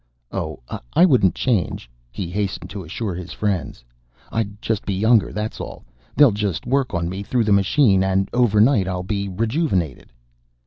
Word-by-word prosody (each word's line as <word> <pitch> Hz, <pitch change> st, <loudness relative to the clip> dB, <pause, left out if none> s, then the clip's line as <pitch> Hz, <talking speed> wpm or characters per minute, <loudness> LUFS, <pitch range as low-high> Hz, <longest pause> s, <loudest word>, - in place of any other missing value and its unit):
"Oh, -, -, -4 dB, 0.3 s
I 175 Hz, -, +6 dB
wouldn't 125 Hz, -, +3 dB
change," 105 Hz, -, -1 dB, 0.2 s
he 85 Hz, +7 st, -5 dB
hastened 100 Hz, 0 st, -3 dB
to 100 Hz, -2 st, -6 dB
assure 95 Hz, +5 st, -4 dB
his 90 Hz, 0 st, -7 dB
friends. 95 Hz, -, -2 dB, 0.5 s
"I'd 105 Hz, -2 st, -2 dB
just 110 Hz, -2 st, -2 dB
be 100 Hz, -, -2 dB
younger, 110 Hz, +2 st, +3 dB
that's 105 Hz, +1 st, -4 dB
all. -, -, -8 dB, 0.3 s
They'll 145 Hz, -5 st, +7 dB
just 100 Hz, -5 st, -2 dB
work 135 Hz, -3 st, 0 dB
on 85 Hz, 0 st, -1 dB
me 95 Hz, +3 st, -4 dB
through 120 Hz, +4 st, 0 dB
the 105 Hz, -, 0 dB
machine, 100 Hz, 0 st, +4 dB
and 95 Hz, 0 st, +1 dB
over 120 Hz, -4 st, +3 dB
night 110 Hz, -4 st, +4 dB
I'll 90 Hz, -1 st, -2 dB
be 100 Hz, 0 st, -2 dB
rejuvenated." 100 Hz, -, -1 dB
100 Hz, 170 wpm, -21 LUFS, 95-115 Hz, 0.5 s, They'll